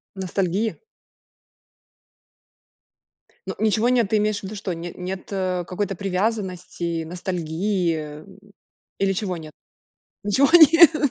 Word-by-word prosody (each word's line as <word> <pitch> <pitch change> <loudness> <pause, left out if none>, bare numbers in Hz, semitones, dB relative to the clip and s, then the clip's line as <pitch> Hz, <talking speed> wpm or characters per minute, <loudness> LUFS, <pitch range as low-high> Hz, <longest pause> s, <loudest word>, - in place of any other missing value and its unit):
Ностальгия? 190 +3 -1 2.7
Ну, - - -4
ничего 220 +2 +2
нет. 240 -4 +3
Ты 215 0 +2
имеешь 210 0 0
в - - -22
виду 195 +3 -6
что? 195 -2 -4
Не 170 +1 -7
нет, 185 +1 -6
э, 185 -2 -1
какой-то 195 0 -3
привязанности, 185 -4 -2
ностальгии? 165 -2 -2 0.8
Или 195 0 +2
чего 185 -2 -2
нет? 155 -2 -10 0.7
Ничего 220 +7 +3
нет? 325 -3 +7
190 Hz, 110 wpm, -23 LUFS, 175-215 Hz, 2.7 s, нет